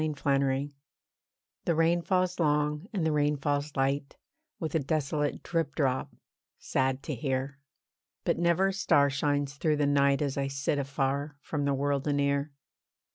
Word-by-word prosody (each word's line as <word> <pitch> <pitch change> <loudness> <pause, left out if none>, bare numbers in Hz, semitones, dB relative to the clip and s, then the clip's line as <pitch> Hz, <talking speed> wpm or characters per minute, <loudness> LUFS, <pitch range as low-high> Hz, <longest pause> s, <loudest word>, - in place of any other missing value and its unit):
THE 155 -1 -1
SEARCH 140 0 +1 0.9
The 170 - +2
rain 165 +2 +3
falls 180 0 0
long, 150 +1 +1
and 190 -7 -1
the 160 - +2
rain 150 0 +2
falls 145 +1 -1
light, 140 +1 -1 0.4
With 160 -4 -3
a 160 - +3
desolate 150 0 -1
drip 165 -4 -1
drop, 130 -3 0 0.5
sad 130 0 -1
to 150 - -3
hear. 135 +2 -2 0.6
But - - 0
never 170 +3 +3
a - - -2
star 145 -7 +3
shines 145 0 -1
through 150 0 +1
the 145 - +2
night 140 0 +3
As 140 -1 -2
I 140 0 0
sit 140 +1 -1
afar, 140 +1 -1
from 145 -1 -3
the 140 -1 +1
world 140 +1 0
anear. 140 0 +1
145 Hz, 160 wpm, -29 LUFS, 140-155 Hz, 0.9 s, rain